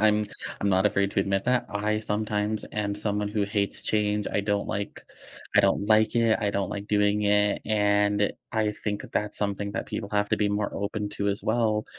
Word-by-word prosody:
I'm 105 0 +4 0.4
I'm 100 - +1
not 95 +1 +4
afraid 100 -1 +1
to - - +2
admit 95 0 0
that. 125 -1 +1
I 105 +1 0
sometimes 105 0 -1
am 100 -1 -1
someone 105 0 -1
who 105 0 -1
hates 100 0 -1
change, 105 -1 0
I - - +2
don't 100 0 -1
like 100 -1 -4 0.5
I - - +9
don't - - +2
like 110 +1 +4
it, 115 -2 +3
I 105 -2 +1
don't 100 -1 -1
like 100 0 -5
doing 105 0 +2
it, 105 0 +2
and 105 -1 +2 0.2
I 110 -2 +1
think 105 -1 -2
that's 105 0 -1
something 100 0 -2
that - - -3
people 100 - -4
have 105 0 +1
to - - +3
be 105 -1 +1
more 105 0 -1
open 105 +1 -2
to 100 -1 -2
as 100 0 -2
well, 110 -3 +1
105 Hz, 205 wpm, -26 LUFS, 100-105 Hz, 0.5 s, I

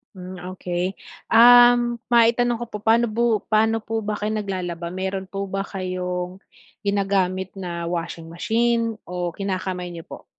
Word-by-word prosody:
Hmm, 185 0 -8 0.2
okey. 180 +1 -3 0.3
Um, 240 0 +7
maitanong 240 0 +3
ko - - -1
po, 210 - -5
paano 225 +2 +3
po 230 -1 +1
paano 220 +1 +2
po 225 0 -3
ba 210 -1 -2
kayo 210 +1 -3
naglalaba? 180 -4 -4
Meron 190 0 -3
po 195 0 -5
ba 195 0 -2
kayong 180 -1 -4 0.5
ginagamit 190 -2 0
na 170 -2 -4
washing 165 -1 -4
machine 230 +5 0
o 175 -2 -4
kinakamay 185 -2 -3
niyo 165 -1 -9
po? - - -11
195 Hz, 145 wpm, -23 LUFS, 180-225 Hz, 0.5 s, Um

